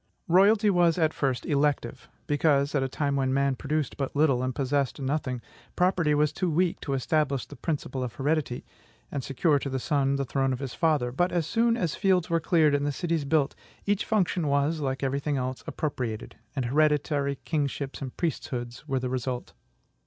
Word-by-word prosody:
Royalty 200 +4 +5
was 175 -2 +3
at 160 -2 +2
first 130 -4 -1
elective, 140 -5 0 0.2
because 145 -1 +2
at 140 - +2
a 135 - -1
time 140 +1 -1
when 135 -1 +1
man 140 0 +2
produced 150 +2 -2
but 140 -1 -3
little 140 -4 +3
and 130 -1 -2
possessed 140 0 0
nothing 135 -3 -2 0.3
property 180 -4 +2
was 150 0 +2
too 185 -2 -1
weak 170 +2 +1
to 140 - -3
establish 140 0 0
the 145 - -11
principle 140 -2 -3
of 120 -2 -5
heredity, 145 -3 -1 0.5
and 140 -2 -3
secure 145 +3 +2
to 140 - -4
the 135 - -2
son 140 +1 +1
the 140 0 -1
throne 135 0 0
of - - -2
his 135 -3 -5
father; 150 -7 +1
but 175 +8 +1
as 170 -3 0
soon 230 +5 +2
as 175 -8 -1
fields 185 -4 +1
were 165 - +3
cleared, 160 -2 +3
and 145 0 +1
cities 165 -4 -1
built, 145 -1 +2 0.3
each 205 -1 +1
function 180 -6 +1
was, 140 +3 +1
like 135 -2 -2
every 135 +1 0
thing 145 0 -1
else, 130 0 -3
appropriated, 125 -7 -3 0.2
and 130 -3 -1
hereditary 145 +1 +2
kingships 140 -3 -2
and 130 -2 -6
priesthoods 125 -5 -3
were 135 -2 0
the 130 0 -1
result. 125 0 -3
145 Hz, 190 wpm, -27 LUFS, 135-160 Hz, 0.5 s, Royalty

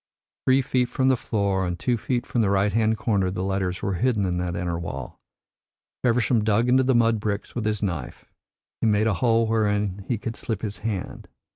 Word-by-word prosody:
Three 130 +1 +4
feet 125 -1 0
from 130 +1 +1
the 130 - +4
floor 100 -5 -1
and 90 -1 -2
two 120 +8 0
feet 120 +2 -2
from 120 - 0
the 105 - +2
right 100 0 +2
hand 110 0 +2
corner 100 -5 +1
the 90 0 -3
letters 95 -2 -2
were 100 - 0
hidden 105 +2 +1
in 90 -1 -1
that 90 -1 -2
inner 85 -1 -2
wall. 70 -5 -6 0.8
Feversham 120 -2 +2
dug 110 +3 +2
into 130 +1 +5
the 130 -1 +2
mud 115 -1 +3
bricks 105 -1 -3
with 120 -3 -3
his 105 -1 -1
knife; 90 -7 -4 0.6
he - - +2
made 105 0 +3
a 110 - +2
hole 115 +3 +2
wherein 105 -3 0
he 120 - 0
could 115 +2 -5
slip 110 -3 -4
his 105 -1 -4
hand. 105 -3 -4
105 Hz, 210 wpm, -24 LUFS, 95-115 Hz, 0.8 s, into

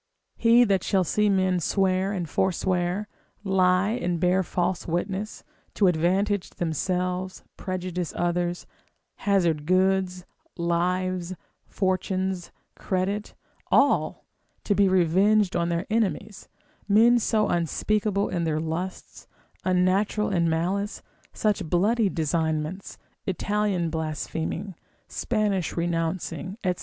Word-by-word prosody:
He 235 +1 +5
that 195 -5 +1
shall 190 -3 +2
see 210 +5 +1
men 185 -2 +2
swear 190 +2 +1
and 180 -4 -3
forswear, 185 +3 0 0.4
lie 190 0 +3
and 180 -8 -1
bear 180 +2 +3
false 180 0 -2
witness, 190 +5 -3 0.3
to 205 - +3
advantage 185 +3 +1
themselves, 180 +3 -2
prejudice 180 -2 -4
others, 175 0 -1 0.6
hazard 170 -7 +2
goods, 185 0 +1 0.3
lives, 180 +1 -1 0.3
fortunes, 190 -1 -1 0.2
credit, 195 +3 -2 0.3
all, - - +2 0.4
to 205 - +1
be 200 0 +4
revenged 190 +3 +3
on 170 0 +1
their 170 +2 -1
enemies, 210 -2 -1 0.4
men 230 +4 +5
so 215 -1 +1
unspeakable 200 +4 0
in 175 -2 -2
their 155 -2 0
lusts, 165 +4 -5 0.4
unnatural 185 +3 +1
in 170 -3 +2
malice, 190 +6 -1 0.3
such 210 -2 0
bloody 205 +7 +2
designments, 160 +2 -2 0.3
Italian 195 -3 0
blaspheming, 160 +4 -3 0.3
Spanish 205 -7 -1
renouncing, 170 +3 -2
&c. 180 - +3
185 Hz, 105 wpm, -25 LUFS, 175-200 Hz, 0.6 s, He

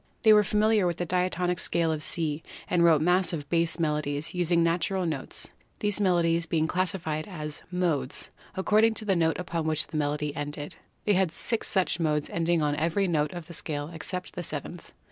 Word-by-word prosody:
They 220 - +8
were 210 0 +6
familiar 210 -1 +3
with 175 -1 -1
the 175 - -2
diatonic 180 0 0
scale 165 -1 +2
of 155 -1 -2
C 155 -1 -1 0.3
and 175 -1 +2
wrote 160 -3 +5
massive 175 -4 +1
bass 170 -1 +1
melodies, 150 -2 -1
using 175 -1 +2
the 165 - +4
natural 180 +2 -1
notes, 155 -5 -3 0.3
these 210 0 0
melodies 170 -3 +2
being 160 -1 +1
classified 165 -3 -1
as 155 -6 -5
"modes," 165 -7 -1 0.2
according 215 +4 +3
to 220 - -4
the 195 -2 +2
note 165 -1 +2
upon 170 -3 -3
which 155 -1 +1
the 155 - -5
melody 150 0 -1
ended. 145 0 -5 0.3
They 210 - +4
had 190 -3 +2
six 230 +5 0
such 185 -3 +1
modes 150 -3 0
ending 170 -1 +1
on 145 0 +1
every 170 +5 +1
note 150 -4 +1
of 175 -2 -7
the 170 - -10
scale 150 -1 -3
except 180 +3 -5
the - - -4
seventh. 160 +1 -6
170 Hz, 190 wpm, -27 LUFS, 155-180 Hz, 0.3 s, They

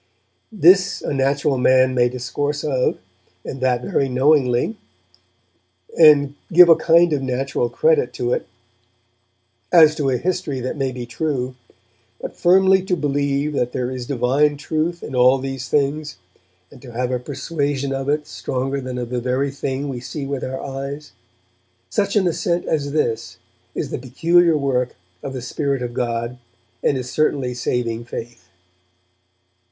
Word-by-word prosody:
'This 190 -1 +4
a - - -2
natural 135 0 +1
man 130 0 +4
may 125 -1 +3
discourse 140 +4 -3
of, 130 -4 0 0.5
and 135 - -6
that 125 -1 +1
very 135 +1 0
knowingly, 130 - +2 1.2
and 145 -3 +6 0.2
give 175 0 +8
a 165 - +9
kind 170 0 +4
of 145 - 0
natural 130 -1 -1
credit 470 - +2
to - - -2
it, - - -3 1.2
as 160 -3 +7
to 145 -3 -1
a 130 - +1
history 170 -2 -2
that 125 +1 -4
may 135 -3 -1
be 125 -1 -6
true; 130 0 -3 0.7
but - - -7
firmly 190 +2 +4
to 185 -1 -1
believe 145 -1 -1
that 125 -3 -1
there 125 0 -2
is 125 -2 -6
divine 140 +3 +1
truth 160 +4 -2
in - - -7
all 125 +1 +5
these 135 -1 -5
things, 150 0 -1 0.5
and 130 - -15
to 125 - -11
have 125 +2 -2
a 125 - -1
persuasion 140 0 -3
of 135 +1 -3
it 150 +1 0
stronger 135 +2 -3
than 130 -1 -5
of 120 -1 -5
the 125 -1 -1
very 130 +3 -1
thing 140 0 -3
we 130 -3 -4
see 140 +3 -6
with 140 -1 -4
our 130 +1 -4
eyes; 140 +2 -6 0.8
such 200 -2 0
an 200 -3 +3
assent 175 0 -1
as 145 -3 -1
this 115 - -2 0.4
is - - -3
the - - -3
peculiar 165 +6 +3
work 125 -3 -1 0.3
of 135 - -6
the 130 -2 -6
Spirit 140 0 -2
of 120 -1 -5
God, 120 0 -3 0.4
and 140 - +1
is 125 -1 -5
certainly 140 -5 0
saving 120 -1 -2
faith.' 115 -5 -9
135 Hz, 160 wpm, -20 LUFS, 125-150 Hz, 1.2 s, a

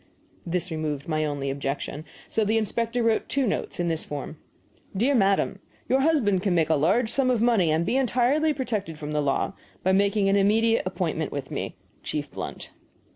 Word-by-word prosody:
This 175 +1 -1
removed 150 -3 -3
my 155 -1 0
only 140 -2 -2
objection. 140 +2 -4 0.2
So 220 - 0
the 215 +2 +2
inspector 230 +2 0
wrote 225 -1 +1
two 275 -1 +1
notes, 205 - -2
in 175 - 0
this 160 -2 0
form: 145 +1 -6 0.6
DEAR 250 +8 +3
MADAM, 195 -5 +2 0.3
Your 260 - +3
husband 265 - +2
can 190 -3 +1
make 160 -1 +2
a - - +5
large 200 - +2
sum 270 -2 +2
of 245 -3 +2
money 225 -7 +3
(and 160 +2 +1
be 255 - +1
entirely 270 +4 +2
protected 215 - -3
from 150 0 -6
the 150 0 +1
law) 140 +5 0 0.3
by 190 - +3
making 200 +1 +3
an 195 +1 +4
immediate, 220 +1 +3
appointment 170 -4 -2
with 140 -2 -5
me. - - -4 0.3
Chief 145 -2 -4
BLUNT. - - -6
195 Hz, 185 wpm, -26 LUFS, 155-230 Hz, 0.6 s, a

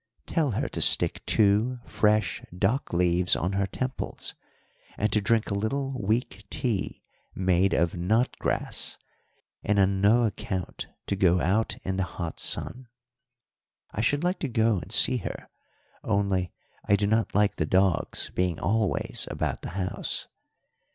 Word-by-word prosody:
'Tell 150 -7 0
her - - -1
to - - -4
stick - - +4
two 110 +4 +3
fresh 105 -3 +1 0.2
dock 110 +9 0
leaves 90 +1 +3
on 90 +3 -1
her 100 0 0
temples, 130 +5 -4 0.6
and 105 0 0
to 105 - +3
drink 110 +1 +1
a - - 0
little 135 +7 -2
weak 105 -1 -1
tea 110 -2 -2 0.3
made 95 +1 +2
of 85 0 +1
knot 110 +8 +1
grass, - - -1 0.7
and 105 0 +1
on 95 0 +2
no 115 +4 +5
account 95 -4 -4 0.2
to 100 - -1
go 90 -2 +3
out 100 +7 0
in 95 0 -2
the 95 - +1
hot 85 -2 -4
sun. 125 0 -1 1.0
I 105 - -2
should 145 +7 +1
like 180 +2 0
to 145 - -2
go 110 -3 +2
and - - -10
see - - +4
her, - - -6 0.6
only 100 -3 0 0.3
I 100 - +3
do 100 0 0
not 110 0 0
like 105 0 +2
the 80 - -1
dogs 95 -1 +1
being 90 -3 0
always 105 +4 0
about - - -3
the - - -6
house. 95 -1 -3
100 Hz, 150 wpm, -27 LUFS, 95-110 Hz, 1.0 s, no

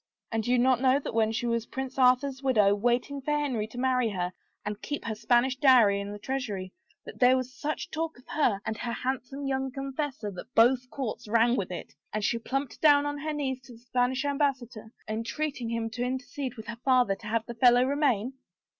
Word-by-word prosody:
And 225 -1 0
do 245 - -2
you 250 - +4
not 250 0 +3
know 260 0 +4
that 285 - -5
when 220 -1 +2
she 225 +2 -2
was 235 -1 -1
Prince 265 0 -5
Arthur's 255 +1 +3
widow, 215 -7 +4
waiting 245 +6 0
for 295 +2 0
Henry 255 -8 -1
to 225 - -12
marry 250 -2 +2
her 180 -3 -3 0.3
and 210 0 -4
keep 290 - -4
her 225 - -2
Spanish 240 +4 +2
dowry 240 -8 +5
in 200 - -5
his 205 0 -8
treasury, 210 -9 -4 0.3
that - - -10
there 255 +1 +6
was 255 0 -4
such 305 +3 -4
talk 320 -1 -3
of 250 - -19
her 240 -10 +1
and 220 -1 -3
her 235 - -3
handsome 265 +2 -3
young 265 0 -1
confessor 270 -4 -4
that 195 +7 -10
both 250 +2 +4
courts 240 -4 -5
rang 230 +2 +3
with 195 -7 -2
it, 180 - -7 0.2
and 215 0 -2
she 230 +2 +1
plumped 270 +3 -3
down 290 -2 +6
on 290 0 -3
her 310 +2 -3
knees 270 -4 -2
to 250 -1 -14
the - - -13
Spanish 250 +3 0
ambassador, 260 -6 -1 0.2
entreating 235 +3 -3
him 230 -1 -1
to 240 - -5
intercede 260 +1 -4
with 220 - -9
her 235 +1 -7
father 255 -6 +4
to 210 +2 -9
have 225 +1 0
the 235 - -6
fellow 245 +1 +5
remain 265 -4 +1
250 Hz, 215 wpm, -28 LUFS, 225-270 Hz, 0.3 s, there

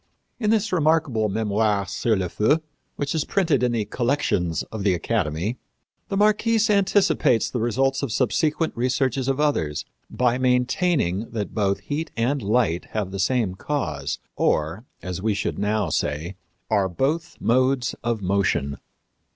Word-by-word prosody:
In 215 -3 0
this 215 -2 +1
remarkable 155 -10 +2
Mémoire 105 -1 0
sur 110 +3 0
le 95 -2 -1
Feu, 145 - +1 0.3
which 145 0 -2
is 160 -3 0
printed 165 - +1
in 125 -1 +2
the 115 -3 -1
Collections 105 - 0
of 110 -3 -4
the 95 -3 +3
Academy, 90 +2 -1 0.5
the 195 - -2
Marquise 215 +1 +3
anticipates 195 - +3
the 125 - -2
results 135 +4 +1
of 140 -5 -2
subsequent 150 +8 +1
researches 130 +1 0
of 135 +1 0
others 80 - 0 0.2
by 125 0 +1
maintaining 125 - +1
that 105 -5 -4
both 100 -2 0
heat 155 +2 -3
and 130 +5 +1
light 105 -5 +1
have 105 -3 -2
the 95 - -5
same 105 0 +1
cause, 90 - -3 0.2
or, 85 +9 0 0.2
as 90 0 -4
we 105 0 +1
should 100 - -2
now 105 -2 0
say, 75 +5 -2 0.4
are 100 -3 +2
both 150 - -2
modes 130 +1 +2
of 115 -3 -1
motion. 90 -8 0
115 Hz, 150 wpm, -24 LUFS, 100-145 Hz, 0.5 s, the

